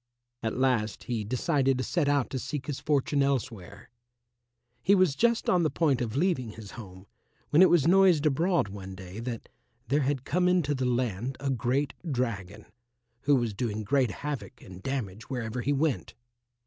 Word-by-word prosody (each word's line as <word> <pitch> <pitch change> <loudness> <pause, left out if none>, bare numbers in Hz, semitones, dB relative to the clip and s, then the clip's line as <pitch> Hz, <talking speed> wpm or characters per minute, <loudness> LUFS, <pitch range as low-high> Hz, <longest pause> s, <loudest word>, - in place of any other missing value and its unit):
At 110 - -2
last 125 -5 +1
he 120 -4 -2
decided 135 - +1
to 130 - -1
set 155 -2 0
out 140 -3 +1
to 130 - -2
seek 145 +2 -4
his 145 -3 -4
fortune 145 -1 +1
elsewhere. 120 -9 -3 0.9
He 200 - +4
was 185 -6 +4
just 235 +3 +2
on 180 - +4
the 160 - +2
point 145 -7 +1
of 115 -1 -3
leaving 140 - 0
his 105 -3 -10
home 95 -4 -11 0.5
when 155 - +6
it 185 - +8
was 165 -6 +4
noised 180 -4 +5
abroad 165 - +2
one 95 -1 -8
day 95 +2 -9
that 115 -1 -5 0.4
there 145 +3 +3
had 135 -1 -1
come 180 +3 +1
into 175 -5 +2
the 130 -2 -1
land 125 0 -1
a 140 -1 -1
great 130 +3 0 0.2
dragon, 110 -6 -3 0.6
who 145 - +5
was 120 -4 0
doing 110 0 -3
great 130 +2 +2
havoc 140 +3 -6
and 95 0 -12
damage 115 -5 -4
wherever 125 -2 -3
he 140 - 0
went. 145 0 -1
130 Hz, 175 wpm, -28 LUFS, 115-145 Hz, 0.9 s, it